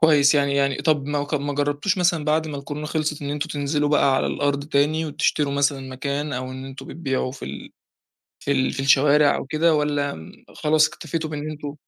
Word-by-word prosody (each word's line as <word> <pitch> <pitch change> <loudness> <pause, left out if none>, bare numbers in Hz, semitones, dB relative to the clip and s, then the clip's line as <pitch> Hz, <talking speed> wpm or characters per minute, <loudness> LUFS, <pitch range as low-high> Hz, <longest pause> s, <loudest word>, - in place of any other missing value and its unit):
كويس، 150 -3 +5
يعني 140 -1 +2
يعني 140 -1 +2
طَب 150 -4 +1
ما 145 0 -1
ك 145 - -4
ما 145 0 -1
جرّبتوش 145 +6 0
مثلًا 170 -3 +2
بَعد 155 +1 +1
ما 150 - -5
الكورونا 145 +2 -6
خِلصت 150 -1 -2
إن 140 - -3
أنتم 150 +2 -3
تنزِلوا 145 0 -1
بقى 140 -2 +3
على - - +1
الأرض 145 0 -1
تاني، 155 +2 +1
وتشتروا 145 -1 0
مثلًا 140 0 +1
مكان 140 +3 -3
أو 130 +1 -4
إن 130 0 -7
أنتم 135 0 -9
بتبيعوا 135 -4 -2
في - - -8
ال 70 +1 -8 0.7
في 140 - -1
ال 130 -1 +1
في - - -3
الشوارع 145 +2 +4
أو - - -5
كده 155 +3 +2
والّا 145 -1 0
م 80 0 -11 0.2
خلاص 155 0 +3
اكتفيتوا 160 -1 -5
بإن 150 0 -4
أنتم 145 -1 -6
145 Hz, 205 wpm, -23 LUFS, 140-150 Hz, 0.7 s, كويس